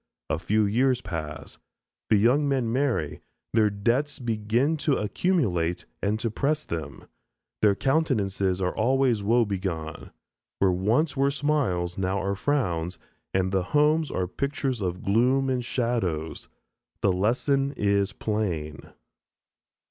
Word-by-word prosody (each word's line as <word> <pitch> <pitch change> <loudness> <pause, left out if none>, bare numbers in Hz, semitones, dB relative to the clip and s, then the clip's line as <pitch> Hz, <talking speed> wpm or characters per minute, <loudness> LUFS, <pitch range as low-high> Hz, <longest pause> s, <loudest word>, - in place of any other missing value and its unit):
A 80 - 0
few 105 +5 +2
years 125 +5 +2
pass. 75 -6 -6 0.5
The - - +5
young 125 +8 +3
men 125 -4 0
marry; 120 - 0 0.3
their 110 -1 +4
debts 115 +9 0
begin 120 +4 0
to 150 -2 +1
accumulate 100 - 0 0.2
and 105 +2 0
to 115 - -1
press 150 +6 0
them, 80 -4 -6 0.5
their 105 -2 +4
countenances 100 - +1
are 90 - -1
always 125 -1 +2
woe 115 +4 +3
begone; 90 -6 -4 0.5
where 95 -1 +3
once 110 - +1
were 135 0 +3
smiles, 135 - 0
now 95 +1 0
are 100 +1 -1
frowns, 90 - -1 0.3
and 95 0 0
the 95 -1 +2 0.2
homes 155 0 +3
are 95 - -1
pictures 135 +3 -2
of 90 -1 -3
gloom 130 +6 +2
and 125 -1 -1
shadows. 115 -11 -2 0.5
The 100 - +3
lesson 135 +8 +1
is 100 -1 +1
plain. 90 -9 -3
110 Hz, 130 wpm, -26 LUFS, 95-135 Hz, 0.5 s, The